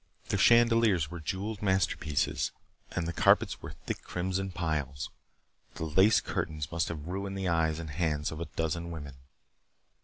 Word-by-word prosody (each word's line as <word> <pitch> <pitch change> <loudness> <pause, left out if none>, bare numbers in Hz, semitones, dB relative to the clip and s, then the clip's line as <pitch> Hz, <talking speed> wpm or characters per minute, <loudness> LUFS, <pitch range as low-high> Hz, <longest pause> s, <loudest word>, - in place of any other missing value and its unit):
The - - +1
chandeliers 115 -9 +5
were 85 - -5
jeweled 100 +6 -3
masterpieces 95 -6 +1 0.4
and 85 -2 -2
the 85 - -2
carpets - - +3
were - - -7
thick - - -3
crimson 95 +2 -2
piles. 75 -6 -2 0.6
The 80 - -3
lace 95 +8 +5
curtains 75 -2 -3
must 85 0 0
have 75 -3 -5
ruined 95 +2 -3
the 95 -1 -1
eyes 80 -2 +2
and 80 -2 -6
hands 75 -2 0
of 80 - -6
a 85 - -3
dozen 85 +1 -1
women. 75 -5 -7
85 Hz, 155 wpm, -30 LUFS, 80-95 Hz, 0.6 s, chandeliers